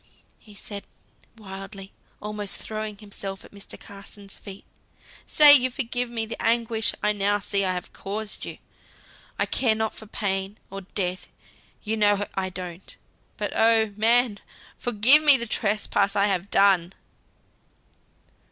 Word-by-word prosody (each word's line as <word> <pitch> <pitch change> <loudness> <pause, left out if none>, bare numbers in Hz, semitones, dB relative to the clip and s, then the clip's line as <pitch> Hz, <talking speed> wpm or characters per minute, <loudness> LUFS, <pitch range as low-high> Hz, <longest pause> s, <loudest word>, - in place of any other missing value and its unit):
said 200 0 -8 0.5
he - - -21
wildly, 195 0 -9 0.3
almost 210 -1 -3
throwing 215 -1 -6
himself 200 -2 -8
at - - -17
Mr. 200 0 -9
Carson's 200 0 -9
feet, 195 -1 -12 0.6
"say 295 -1 +9
you 255 -2 +6
forgive 245 -2 -1
me 230 -2 -2
the 230 - -7
anguish 230 0 +1
I 210 0 +3
now 205 0 +1
see 200 0 0
I 185 -1 0
have 180 - -7
caused 210 +2 -4
you. - - -6 0.8
I - - +1
care 230 -4 +1
not 220 0 -2
for 220 - -10
pain, 195 -1 -2
or 195 0 -7
death, 185 -1 -4 0.6
you 220 +1 -2
know 205 -1 +2
I 190 -1 -2
don't; 180 -1 -8 0.4
but - - -3
oh, 220 -1 +3
man! 225 0 +3 0.4
forgive 245 +6 +6
me 290 -3 +7
the 235 - -2
trespass 205 -2 0
I 200 0 +3
have 195 -1 -1
done!" 190 -3 +3
205 Hz, 145 wpm, -24 LUFS, 195-225 Hz, 0.8 s, say